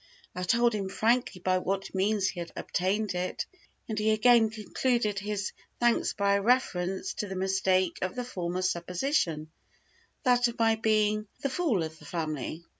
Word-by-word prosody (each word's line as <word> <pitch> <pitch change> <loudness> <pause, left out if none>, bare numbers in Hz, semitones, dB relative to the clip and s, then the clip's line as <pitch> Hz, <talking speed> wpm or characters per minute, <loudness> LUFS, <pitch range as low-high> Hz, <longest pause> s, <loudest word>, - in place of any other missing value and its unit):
I 180 - -5
told 235 +6 +3
him 195 -3 -2
frankly 225 -2 +1
by 185 0 +2
what 195 +1 -3
means 195 +1 +1
he 180 - -6
had 170 -1 -6
obtained 200 +2 -1
it, 180 +1 -2 0.4
and 215 -2 -2
he 215 +1 +2
again 225 +1 +5
concluded 215 -1 -1
his 205 0 -3 0.3
thanks 240 -1 +2
by 200 0 +2
a 200 - +2
reference 190 -6 +1
to 210 - -4
the 190 - -5
mistake 190 -1 +1
of 185 0 -2
the 250 -1 -3
former 180 -5 -3
supposition, 170 - -1 0.7
that 245 -2 +4
of 235 - -6
my 225 -1 +4
being 215 -1 +1 0.2
"the 275 - 0
fool 260 - +1
of 160 0 -7
the - - -14
family." 155 -1 -4
200 Hz, 170 wpm, -29 LUFS, 185-225 Hz, 0.7 s, again